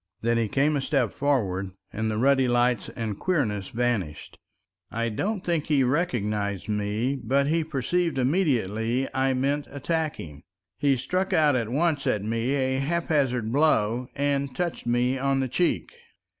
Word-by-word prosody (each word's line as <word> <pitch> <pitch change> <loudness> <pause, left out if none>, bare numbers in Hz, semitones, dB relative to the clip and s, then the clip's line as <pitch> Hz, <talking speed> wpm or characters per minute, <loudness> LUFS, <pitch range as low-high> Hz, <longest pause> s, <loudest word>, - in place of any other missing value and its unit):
Then 115 0 +2
he 115 - +1
came 145 +7 +2
a 140 - 0
step 130 -6 +1
forward, 100 -10 0 0.2
and 110 +1 -1
the 110 - -2
ruddy 135 +2 +3
lights 120 -2 +1
and 110 -4 -4
queerness 110 - 0
vanished. 110 -11 -2 0.5
I 115 +1 -1
don't 195 - -2
think 170 -4 -1
he 145 -3 +3
recognized 105 - -1
me, 105 +6 -1
but 140 +1 +2
he 160 +3 +1
perceived 160 +3 -1
immediately 125 - +1
I 135 0 +1
meant 140 +3 0
attacking. 140 - -3 0.4
He 140 -1 +3
struck 185 +9 -1
out 150 -3 +4
at 115 -3 -1
once 150 +2 0
at 105 - +1
me 115 +3 -1
a 130 -1 0
haphazard 135 -7 0
blow, 125 -4 +2
and 140 -2 -1
touched 175 -8 -3
me 125 +2 +1
on 135 0 +1
the 130 - 0
cheek. 175 +8 0
130 Hz, 155 wpm, -26 LUFS, 115-145 Hz, 0.5 s, out